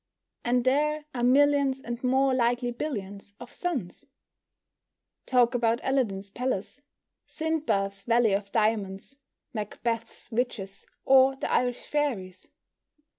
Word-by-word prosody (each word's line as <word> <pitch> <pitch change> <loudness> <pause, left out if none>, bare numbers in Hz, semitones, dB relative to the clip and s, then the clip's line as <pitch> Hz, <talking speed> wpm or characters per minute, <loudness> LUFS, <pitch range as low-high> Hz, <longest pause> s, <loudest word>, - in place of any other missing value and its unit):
And 245 0 +2
there 300 +3 +1
are 245 - -3
millions, 275 +1 +4
and 240 -1 -6
more 265 +1 +3
likely 245 0 +1
billions, 205 -7 -6
of - - -10
suns! 285 - -4 1.2
Talk 245 -2 +4
about 235 -1 +1
Aladdin's 200 -8 -1
palace, 250 +2 -3 0.5
Sinbad's 290 -12 -1
valley 230 -1 +3
of 200 0 -2
diamonds, 210 +2 -1 0.4
Macbeth's 230 +2 -4
witches, 220 -5 -3 0.2
or 265 0 +6
the - - -4
Irish 245 -1 0
fairies! 215 -12 -2
245 Hz, 110 wpm, -27 LUFS, 205-270 Hz, 1.2 s, or